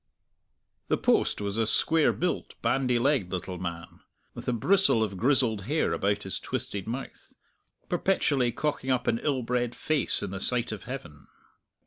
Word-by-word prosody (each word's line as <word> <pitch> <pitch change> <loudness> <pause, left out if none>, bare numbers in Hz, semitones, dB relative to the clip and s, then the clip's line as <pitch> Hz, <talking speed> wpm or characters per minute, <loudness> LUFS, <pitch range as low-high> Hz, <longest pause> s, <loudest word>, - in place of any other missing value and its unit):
The - - +2
post - - +2
was 100 +2 -2
a 110 - +2
square 160 +7 +3
built, 180 +1 -2
bandy 125 -2 +2
legged 120 -7 +1
little 90 -1 -4
man, 85 -2 -6 0.3
with - - -9
a - - +2
bristle 125 - +3
of 100 -3 -3
grizzled 115 -3 +2
hair 155 +6 +1
about 100 +1 0
his 95 - -3
twisted 100 -1 -4
mouth, 125 +4 -7 0.5
perpetually 150 -9 +1
cocking 145 +1 -2
up 130 -1 +1
an 115 - +1
ill 135 -4 0
bred 120 0 -1
face 155 -9 +1
in 100 - -4
the 95 - -4
sight 120 +3 0
of 105 -3 -7
Heaven. 115 - -8
120 Hz, 160 wpm, -28 LUFS, 100-135 Hz, 0.5 s, square